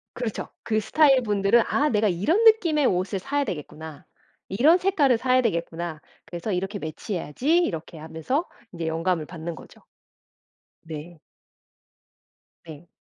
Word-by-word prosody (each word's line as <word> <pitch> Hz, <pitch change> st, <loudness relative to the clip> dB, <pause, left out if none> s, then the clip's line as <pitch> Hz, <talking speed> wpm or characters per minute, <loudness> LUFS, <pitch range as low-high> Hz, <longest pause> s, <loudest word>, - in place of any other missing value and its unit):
그렇죠. 235 Hz, -4 st, -4 dB, 0.2 s
그 215 Hz, -1 st, 0 dB
스타일 270 Hz, +5 st, +4 dB
분들은 205 Hz, +1 st, +3 dB
'아. 295 Hz, +2 st, +1 dB
내가 215 Hz, -3 st, +2 dB
이런 205 Hz, -, +1 dB
느낌의 345 Hz, -10 st, +5 dB
옷을 190 Hz, -1 st, 0 dB
사야 285 Hz, +9 st, -1 dB
되겠구나. 160 Hz, -, -7 dB, 0.4 s
이런 280 Hz, -, +4 dB
색깔을 330 Hz, -10 st, +2 dB
사야 255 Hz, +2 st, +2 dB
되겠구나. 170 Hz, -6 st, -3 dB, 0.2 s
그래서 175 Hz, +5 st, -5 dB
이렇게 195 Hz, +3 st, -2 dB
매치해야지.' 185 Hz, -, -1 dB
이렇게 165 Hz, -, -3 dB
하면서 160 Hz, -, -3 dB, 0.3 s
인제 165 Hz, -2 st, -4 dB
영감을 165 Hz, 0 st, -1 dB
받는 170 Hz, 0 st, -7 dB
거죠. -, -, -15 dB, 1.0 s
네. 160 Hz, +1 st, -8 dB, 1.5 s
네. 160 Hz, +1 st, -12 dB
195 Hz, 300 characters per minute, -25 LUFS, 165-265 Hz, 1.5 s, 느낌의